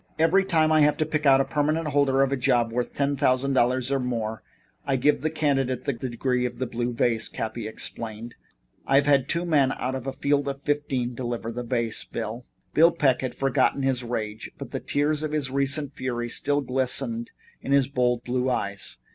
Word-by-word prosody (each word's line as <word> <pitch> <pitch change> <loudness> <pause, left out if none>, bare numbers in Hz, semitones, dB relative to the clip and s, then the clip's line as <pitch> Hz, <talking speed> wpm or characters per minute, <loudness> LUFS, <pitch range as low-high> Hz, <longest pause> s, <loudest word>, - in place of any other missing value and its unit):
"Every 165 +5 +4
time 160 -4 +2
I 155 -1 +5
have 150 0 +4
to 155 - +1
pick 155 -1 -1
out 135 0 +6
a - - 0
permanent 150 +3 0
holder 135 -1 +3
of 135 - 0
a - - +2
job 120 -3 +1
worth 120 +1 -2
ten 140 0 0
thousand 135 0 +2
dollars, 130 +1 +2
or 135 - +2
more, 115 -3 -3 0.4
I 140 -2 0
give 135 +3 +2
the 155 - 0
candidate 140 -5 0
the 140 - 0
Degree 125 +1 -2
of 120 - -9
the 130 - -2
Blue 120 0 -2
Vase," 115 -2 0
Cappy 110 0 -4
explained. 110 +1 -6 0.5
"I've 135 +1 +4
had 140 -2 +3
two 170 +1 +1
men 145 -6 +3
out 130 +1 -2
of 130 0 -5
a - - -1
field 140 +1 0
of 140 0 -4
fifteen 140 -4 -1
deliver 120 -2 -4
the 120 +1 -4
vase, 115 -2 -2
Bill." 115 +2 -6 0.3
Bill 165 +2 +6
Peck 135 -6 +2
had 130 -2 -4
forgotten 135 0 +1
his 130 -2 +1
rage, 110 -3 -4
but - - -8
the - - -3
tears 150 +1 0
of 155 -1 -3
his 145 -4 -1
recent 140 +1 0
fury 120 -3 -3
still 145 +4 0
glistened 135 - -1 0.3
in - - -5
his 140 -2 +4
bold 125 -3 0
blue 125 +1 -1
eyes. 100 -5 -2
135 Hz, 205 wpm, -25 LUFS, 120-145 Hz, 0.5 s, out